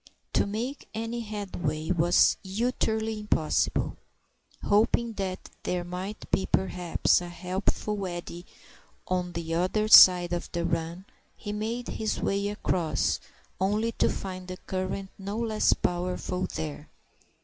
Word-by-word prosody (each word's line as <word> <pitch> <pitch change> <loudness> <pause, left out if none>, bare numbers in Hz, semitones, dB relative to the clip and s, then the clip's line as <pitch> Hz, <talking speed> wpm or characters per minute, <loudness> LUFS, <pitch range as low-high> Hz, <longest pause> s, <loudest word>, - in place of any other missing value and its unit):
To - - +2
make 235 +7 -4
any 230 +2 -3
headway 185 -8 -3
was 175 0 +4
utterly 220 +1 -1
impossible. 185 -7 0 0.7
Hoping 225 +2 +2
that 190 -3 -4
there 180 -1 -1
might 185 +4 -6
be, 190 - +1
perhaps, 180 -2 +2
a 175 - -6
helpful 190 +3 -2
eddy 175 0 -7 0.6
on 180 -1 -1
the 165 -1 -3
other 185 +5 +1
side 180 -4 +9
of 175 - -3
the 170 -1 -1
run, 165 +2 -2 0.3
he 205 - -5
made 225 +3 -3
his 220 -1 -2
way 200 +1 0
across, 185 -5 0 0.4
only 210 +4 +1
to - - +1
find 185 -1 -5
the 185 0 -6
current 190 +1 -4
no 200 +2 -4
less 225 -2 +2
powerful 180 +1 -1
there. 150 -1 -5
190 Hz, 125 wpm, -28 LUFS, 175-215 Hz, 0.7 s, side